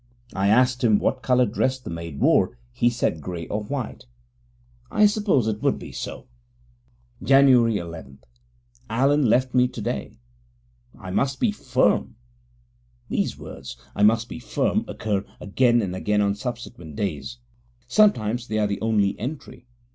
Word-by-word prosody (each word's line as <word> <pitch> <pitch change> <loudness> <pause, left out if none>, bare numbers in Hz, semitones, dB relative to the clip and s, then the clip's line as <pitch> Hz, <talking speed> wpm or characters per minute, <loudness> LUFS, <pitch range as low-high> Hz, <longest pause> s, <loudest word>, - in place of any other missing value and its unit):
I 95 +1 0
asked 125 +4 +3
him 110 -3 +5
what 130 - -1
coloured 125 -4 +2
dress 130 +3 0
the 125 - -8
maid 85 -3 -6
wore; - - +3 0.2
he 120 - +2
said 115 -9 -1
grey 85 0 -5
or 105 - -2
white. 130 - -5 0.8
I 210 - +4
supposed 205 - +2
it 110 -1 -2
would - - +1
be - - -9
so. - - -7 1.0
Jan. 140 +1 +5
11 85 - +1 0.7
Allen 135 +5 +2
left 125 +3 +2
me 125 0 +4
today. - - -5 0.8
I 95 - -7
must 135 +7 0
be 230 - +2
firm. 210 - 0 0.9
These - - -1
words, 60 - -9 0.2
I - - -2
must 110 +2 +4
be - - -8
firm, - - -1
occur 100 -3 -2 0.2
again 120 +3 +2
and 90 -2 -3
again 105 +2 0
on 100 -1 +2
subsequent 115 - -7
days; 100 - -4 0.5
sometimes 120 - +2
they 110 - -2
are 105 - +2
the 100 -1 -3
only 105 -3 +1
entry. 125 0 -7
115 Hz, 145 wpm, -24 LUFS, 100-130 Hz, 1.0 s, him